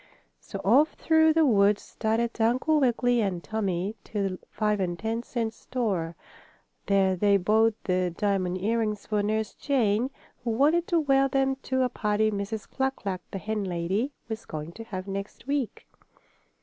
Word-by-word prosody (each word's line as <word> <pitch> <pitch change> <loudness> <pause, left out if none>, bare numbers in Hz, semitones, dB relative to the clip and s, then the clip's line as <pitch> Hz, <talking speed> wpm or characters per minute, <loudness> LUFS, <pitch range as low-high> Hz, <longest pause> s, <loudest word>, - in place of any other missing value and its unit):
So 195 - -7
off 275 +10 +5
through 320 -1 +4
the 320 0 +4
woods 205 -4 +4
started 230 +1 -1
Uncle 255 +7 +3
Wiggily 245 -2 +2
and 185 -4 -2
Tommie 200 -2 -2
to 200 -2 -1
the 185 - -6
five 210 -1 0
and 175 -2 -1
ten 225 +4 -2
cent 230 -2 -3
store. 195 -10 -2 0.7
There 195 -1 +3
they 200 +2 +4
bought 215 +4 +3
the 185 -1 +1
diamond 185 0 -1
earrings 215 0 -1
for 210 -1 0
Nurse 215 +1 -1
Jane, 245 -4 +1 0.3
who 240 - -2
wanted 300 +9 +3
to 340 - +2
wear 275 -3 +3
them 270 0 +1
to 260 -1 0
a 250 - +1
party 215 -2 +1
Mrs. 205 +1 -4
Cluck 265 0 -1
Cluck, 190 -4 -4
the - - -5
hen 210 +1 -2
lady, 190 +8 -1 0.2
was 220 0 -5
going 155 +1 -5
to 225 +6 -9
have 185 -4 -6
next 195 +3 -6
week. 280 -3 -2
220 Hz, 165 wpm, -27 LUFS, 195-245 Hz, 0.7 s, off